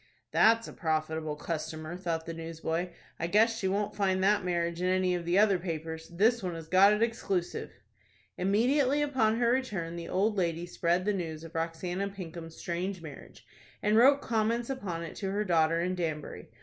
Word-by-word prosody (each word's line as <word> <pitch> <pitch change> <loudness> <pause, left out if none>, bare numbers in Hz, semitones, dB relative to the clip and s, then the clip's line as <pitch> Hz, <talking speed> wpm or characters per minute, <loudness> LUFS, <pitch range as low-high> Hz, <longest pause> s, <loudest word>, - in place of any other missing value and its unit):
"That's 230 +1 +4
a - - -9
profitable 155 -1 -1
customer," 155 +1 -5
thought 170 -3 -3
the 165 - -5
newsboy. 165 +1 -3 0.3
"I 170 - -1
guess 220 +5 +4
she 190 - 0
won't 205 +2 -1
find 190 -2 +1
that 205 +1 +3
marriage 170 -1 -1
in 180 - +1
any 185 0 +2
of 175 -1 -3
the 175 +2 +2
other 200 -3 +4
papers. 160 -2 -5
This 220 +7 +2
one 180 -2 -3
has 165 -1 -8
got 190 +4 +6
it 210 +2 +2
exclusive." 195 -6 -2 0.7
Immediately 255 +9 +2
upon 230 -6 +2
her 235 0 +3
return, 205 -11 -1
the 170 - -6
old 210 +3 +1
lady 170 -1 -1
spread 175 +1 0
the 210 - +2
news 165 -4 -4
of 165 - -10
Roxanna 175 +4 -2
Pinkham's 165 -3 -8
strange 180 +2 -3
marriage, 150 -3 -11 0.4
and 210 +1 +3
wrote 275 +5 +6
comments 230 +2 0
upon 185 -10 -4
it 165 - -7
to 195 - -3
her 205 +2 0
daughter 165 -2 +3
in 180 +1 0
Danbury. 160 -4 -4
180 Hz, 185 wpm, -30 LUFS, 165-210 Hz, 0.7 s, got